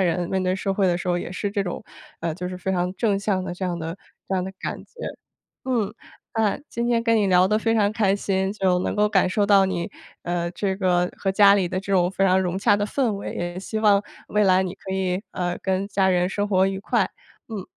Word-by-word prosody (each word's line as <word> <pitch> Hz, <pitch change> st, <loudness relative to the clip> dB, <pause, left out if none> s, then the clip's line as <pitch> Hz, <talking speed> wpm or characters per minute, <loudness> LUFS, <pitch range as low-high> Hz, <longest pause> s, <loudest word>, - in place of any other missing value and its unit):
人、 175 Hz, -1 st, +1 dB
面 190 Hz, -1 st, 0 dB
对 185 Hz, 0 st, +1 dB
社 195 Hz, 0 st, -2 dB
会 195 Hz, -1 st, +2 dB
的 175 Hz, -1 st, +2 dB
时 180 Hz, -, -4 dB
候 175 Hz, -, +2 dB
也 175 Hz, +1 st, -4 dB
是 200 Hz, +2 st, -2 dB
这 200 Hz, -1 st, 0 dB
种， 175 Hz, -, -4 dB, 0.4 s
呃 165 Hz, -1 st, -2 dB
就 180 Hz, +1 st, -5 dB
是 180 Hz, 0 st, -5 dB
非 190 Hz, -, -2 dB
常 180 Hz, -1 st, 0 dB
正 200 Hz, -1 st, +1 dB
向 195 Hz, -2 st, 0 dB
的 180 Hz, -1 st, -5 dB
这 185 Hz, -, -4 dB
样 175 Hz, -2 st, -2 dB
的 165 Hz, +2 st, -5 dB, 0.3 s
这 190 Hz, -, 0 dB
样 185 Hz, -1 st, 0 dB
的 190 Hz, -, -6 dB
感 -, -, -3 dB
觉。 -, -, -32 dB, 0.8 s
嗯， 225 Hz, -6 st, 0 dB, 0.4 s
啊， 220 Hz, -3 st, +2 dB
今 235 Hz, 0 st, -2 dB
天 235 Hz, -1 st, +2 dB
跟 230 Hz, -1 st, +3 dB
你 210 Hz, -, +2 dB
聊 185 Hz, -1 st, +5 dB
得 210 Hz, +1 st, +2 dB
非 225 Hz, +1 st, +1 dB
常 210 Hz, -2 st, +3 dB
开 205 Hz, -3 st, +2 dB
心， 195 Hz, -1 st, -1 dB
就 190 Hz, -3 st, +2 dB
能 185 Hz, -, -2 dB
够 210 Hz, 0 st, +3 dB
感 195 Hz, -3 st, +3 dB
受 200 Hz, +2 st, +1 dB
到 195 Hz, -2 st, +6 dB
你， 180 Hz, -2 st, -2 dB, 0.3 s
呃， 170 Hz, 0 st, -2 dB
这 190 Hz, +1 st, -2 dB
个 180 Hz, -2 st, +1 dB
和 195 Hz, -, 0 dB
家 200 Hz, 0 st, +6 dB
里 190 Hz, -3 st, +1 dB
的 185 Hz, -, -2 dB
这 200 Hz, +1 st, -6 dB
种 180 Hz, -1 st, +3 dB
非 195 Hz, -, 0 dB
常 190 Hz, 0 st, +4 dB
融 185 Hz, 0 st, -1 dB
洽 205 Hz, -1 st, +4 dB
的 205 Hz, -, 0 dB
氛 245 Hz, -1 st, 0 dB
围， 200 Hz, -, -5 dB
也 175 Hz, +1 st, -4 dB
希 215 Hz, +3 st, -4 dB
望 205 Hz, -2 st, +4 dB, 0.2 s
未 210 Hz, 0 st, +2 dB
来 185 Hz, -1 st, +4 dB
你 185 Hz, 0 st, -3 dB
可 195 Hz, -, -8 dB
以， 190 Hz, +1 st, -1 dB
呃， 175 Hz, -1 st, -2 dB
跟 190 Hz, +1 st, 0 dB
家 195 Hz, -2 st, +1 dB
人 180 Hz, -1 st, +2 dB
生 205 Hz, +1 st, -1 dB
活 190 Hz, -1 st, +3 dB
愉 195 Hz, 0 st, -3 dB
快， 200 Hz, -, +1 dB, 0.4 s
嗯。 205 Hz, -4 st, -5 dB
190 Hz, 270 characters per minute, -24 LUFS, 180-205 Hz, 0.8 s, 到